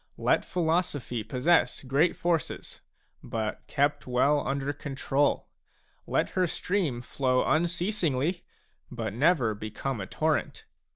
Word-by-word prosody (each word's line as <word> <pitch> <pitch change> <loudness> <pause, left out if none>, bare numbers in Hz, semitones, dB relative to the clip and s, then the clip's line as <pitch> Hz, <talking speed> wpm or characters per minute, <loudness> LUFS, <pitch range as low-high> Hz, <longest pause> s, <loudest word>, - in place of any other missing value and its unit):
Let - - +2
philosophy 160 -9 -1
possess 130 +11 +2
great 140 +6 +2
forces, 170 -4 -2 0.4
but 110 -2 -3
kept 145 0 0
well 135 +4 +3
under 140 +1 -2
control; 140 0 0 0.6
let - - +1
her 185 -1 +2
stream 165 -9 -1
flow 130 0 +1
un 165 +3 +3
ceasingly, 175 -3 0 0.5
but 115 -4 -4
never 130 -3 +3
become 110 +3 -4
a 95 - -5
torrent. - - -1
140 Hz, 115 wpm, -28 LUFS, 125-170 Hz, 0.6 s, well